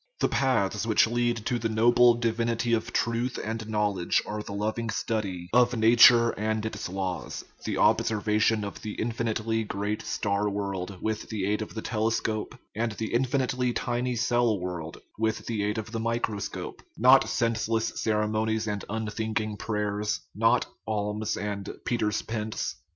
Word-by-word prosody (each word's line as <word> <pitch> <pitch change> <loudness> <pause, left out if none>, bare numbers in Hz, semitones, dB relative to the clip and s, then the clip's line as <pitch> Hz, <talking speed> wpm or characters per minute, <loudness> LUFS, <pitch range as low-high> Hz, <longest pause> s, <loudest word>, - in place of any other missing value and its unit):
The - - +3
paths 110 -5 +1
which 110 - +5
lead 120 -1 0
to 120 - 0
the 115 - -1
noble 120 +2 +5
divinity 115 0 0
of 115 +1 0
truth 120 +2 0
and 110 0 -4
knowledge 105 -5 +1
are 105 0 -4
the 105 - -8
loving 110 +3 -2
study 100 -6 -2
of 125 0 +4
nature 115 +1 +7
and 110 +1 -2
its 110 - -4
laws, 95 -1 -4 0.2
the - - -1
observa 110 -2 +2
tion 110 -1 +3
of 100 - -6
the 105 -1 -5
infinitely 115 -1 -1
great 105 +1 -3
star 105 -1 -1
world 100 -2 -3
with 110 -1 -2
the 105 -4 -2
aid 105 +2 0
of 110 - -6
the 110 - -4
telescope, 110 -1 -1 0.2
and 115 +1 -1
the 110 +1 -4
infinitely 125 0 +1
tiny 120 +1 -1
cell 120 -3 +2
world 85 -3 -5 0.2
with 110 0 0
the 110 -3 -2
aid 105 +2 -1
of 110 0 -5
the 115 - -3
microscope 115 -3 -3 0.2
not 130 +3 +6
senseless 115 -1 0
ceremonies 110 +1 0
and 105 -2 -3
unthinking 110 0 -2
prayers, 105 0 -2
not - - +3 0.2
alms 105 0 -1
and 100 -1 -4 0.2
Peter's 105 -3 0
Pence. 110 -1 -3
110 Hz, 155 wpm, -27 LUFS, 105-115 Hz, 0.2 s, nature